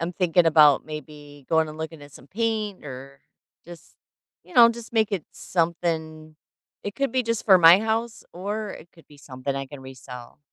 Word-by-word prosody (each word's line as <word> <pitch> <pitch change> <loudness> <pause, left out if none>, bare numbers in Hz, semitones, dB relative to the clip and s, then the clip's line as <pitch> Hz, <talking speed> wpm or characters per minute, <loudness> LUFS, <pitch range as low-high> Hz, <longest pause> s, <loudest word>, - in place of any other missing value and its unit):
I'm 170 +2 -3
thinking 175 -1 +2
about 150 -3 +5
maybe 145 -2 -11
going 160 -1 +2
and 155 +1 -10
looking 160 -1 -7
at 145 -1 -14
some 130 - -15
paint 215 -1 -3
or 135 0 -10 0.4
just, 175 -2 -14 0.5
you - - -18
know, 235 -1 +8
just 235 0 -7
make 220 -2 +1
it 180 -6 -2
something. 160 -2 -3 0.5
It 205 - -6
could 275 -2 -1
be 255 -1 +1
just 230 -1 -3
for 195 -3 +8
my 170 +2 +8
house, 225 +1 -2
or 205 +4 -4
it 170 - -11
could 165 - -21
be 145 - -18
something 135 0 -6
I 135 - -3
can 145 0 -11
resell. 125 -2 -11
165 Hz, 190 wpm, -24 LUFS, 145-205 Hz, 0.5 s, know